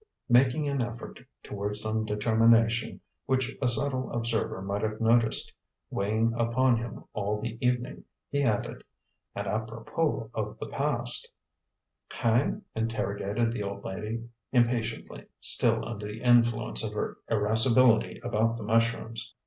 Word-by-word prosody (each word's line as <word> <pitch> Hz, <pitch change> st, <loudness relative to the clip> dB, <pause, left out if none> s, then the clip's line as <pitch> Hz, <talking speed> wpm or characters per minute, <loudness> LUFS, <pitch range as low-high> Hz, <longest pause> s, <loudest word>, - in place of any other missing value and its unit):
Making 130 Hz, +5 st, +4 dB
an 140 Hz, -2 st, 0 dB
effort 120 Hz, 0 st, -6 dB, 0.2 s
toward 105 Hz, 0 st, -4 dB
some 110 Hz, +1 st, -1 dB
determination 115 Hz, +2 st, +2 dB, 0.3 s
which 130 Hz, 0 st, 0 dB
a 130 Hz, -, +2 dB
subtle 130 Hz, +2 st, -1 dB
observer 115 Hz, -4 st, -1 dB
might 100 Hz, +2 st, -3 dB
have 110 Hz, 0 st, -2 dB
noticed 115 Hz, 0 st, +2 dB, 0.4 s
weighing 110 Hz, +3 st, +1 dB
upon 120 Hz, +2 st, +2 dB
him 115 Hz, 0 st, -7 dB
all 105 Hz, 0 st, -1 dB
the 115 Hz, +1 st, -4 dB
evening, 125 Hz, 0 st, -1 dB, 0.2 s
he 145 Hz, -, -1 dB
added: 110 Hz, -7 st, -1 dB, 0.5 s
"And, 100 Hz, -, -3 dB
apropos 115 Hz, +5 st, -2 dB
of 105 Hz, -1 st, -4 dB
the -, -, -6 dB
past -, -, -1 dB, 0.4 s
" -, -, -27 dB
"Hein?" 120 Hz, -, +1 dB
interrogated 110 Hz, 0 st, -1 dB
the 115 Hz, -, -4 dB
old 100 Hz, 0 st, -5 dB
lady, 110 Hz, +4 st, -5 dB, 0.2 s
impatiently, 120 Hz, -2 st, 0 dB
still 115 Hz, -2 st, +1 dB
under 105 Hz, -3 st, -5 dB
the 105 Hz, +3 st, -8 dB
influence 115 Hz, -, +3 dB
of -, -, -3 dB
her -, -, -3 dB
irascibility 115 Hz, +2 st, +4 dB
about 115 Hz, -1 st, +1 dB
the 115 Hz, -, -6 dB
mushrooms. 115 Hz, +1 st, 0 dB
115 Hz, 135 wpm, -28 LUFS, 110-120 Hz, 0.5 s, Making